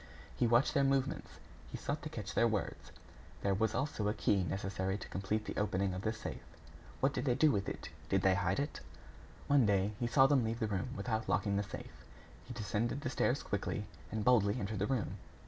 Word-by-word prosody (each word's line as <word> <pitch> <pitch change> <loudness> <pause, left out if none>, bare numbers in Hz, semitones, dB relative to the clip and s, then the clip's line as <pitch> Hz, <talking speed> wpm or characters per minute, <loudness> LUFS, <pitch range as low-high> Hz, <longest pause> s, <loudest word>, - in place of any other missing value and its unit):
He 120 - +2
watched 120 +4 +4
their 140 -2 +3
movements; 135 0 0 0.4
he - - -4
sought - - -3
to - - -5
catch - - -5
their - - +4
words. - - -3 0.5
There 100 - +2
was 105 +2 +1
also 130 -6 -1
a 105 - 0
key 100 -2 +2
necessary 95 +1 -2
to 95 - -8
complete 105 +3 -2
the - - -5
opening 100 -2 +1
of 90 - -4
the 110 - 0
safe. 115 0 -6 0.6
What - - +3
did - - -2
they 120 - +3
do 155 +2 +5
with 100 -4 0
it? - - -6 0.2
Did 95 -1 +2
they 95 - +5
hide 95 0 +1
it? 145 +1 -2 0.7
One 140 -5 +4
day, 100 0 +2
he 120 - 0
saw 135 +3 +6
them 135 -2 +4
leave 115 +1 -1
the 110 - +1
room 100 +2 -2
without 110 -2 -2
locking 100 -2 +1
the 100 - +2
safe. 105 - -8 0.4
He 125 - -7
descended 115 +4 -1
the - - -2
stairs - - +1
quickly, - - -2 0.3
and 110 -1 -2
boldly 115 -2 +4
entered 105 0 -3
the 105 - +1
room. 130 -6 -1
105 Hz, 215 wpm, -34 LUFS, 100-120 Hz, 0.7 s, saw